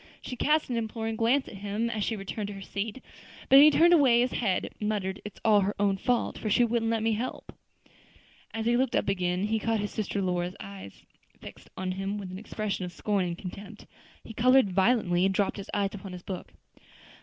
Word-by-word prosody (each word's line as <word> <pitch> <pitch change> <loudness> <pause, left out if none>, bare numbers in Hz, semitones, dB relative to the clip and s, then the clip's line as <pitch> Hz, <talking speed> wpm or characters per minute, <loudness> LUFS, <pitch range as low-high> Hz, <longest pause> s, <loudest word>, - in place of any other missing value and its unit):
She 250 - -7
cast 300 +4 +2
an 240 - 0
imploring 225 0 -3
glance 245 +5 +2
at 195 - -9
him, 205 +3 -2
as 220 -3 -2
she 225 - -1
returned 200 +1 -5
to 205 - -7
her 195 - -9
seat; 210 +6 -5 0.5
but 270 - +9
he 300 +2 +9
turned 335 +3 +5
away 265 -8 +5
his 250 - +1
head, 195 -6 -1
muttering, 210 -3 -2
"It's 210 - -9
all 215 -2 +6
her 200 +2 -1
own 200 -1 +2
fault, 245 +4 -1
for 215 - -3
she 240 - +4
wouldn't 230 -1 +1
let 225 -1 0
me 225 - +2
help 235 +4 -4
her." - - -33 0.6
As 225 0 -4
he 235 +1 +3
looked 260 0 +1
up - - +1
again, 180 -1 0
he 220 +1 0
caught 225 +1 0
his 205 0 -3
sister 210 -1 -3
Lora's 180 -1 -1
eyes 100 -1 -10 0.3
fixed - - -12
on 185 0 -2
him 195 +2 -3
with 195 -3 -7
an 185 - -7
expression 215 -2 -4
of 180 - -5
scorn 195 +2 -1
and 170 -1 -4
contempt. 195 +2 -9 0.4
He 225 - -10
colored 255 -2 +4
violently, 190 -3 +2
and 190 0 +2
dropped 200 +1 0
his 200 - -8
eyes 200 -1 -1
upon 195 -2 -8
his 180 -1 -9
book. 185 -2 -7
210 Hz, 220 wpm, -28 LUFS, 190-230 Hz, 0.6 s, but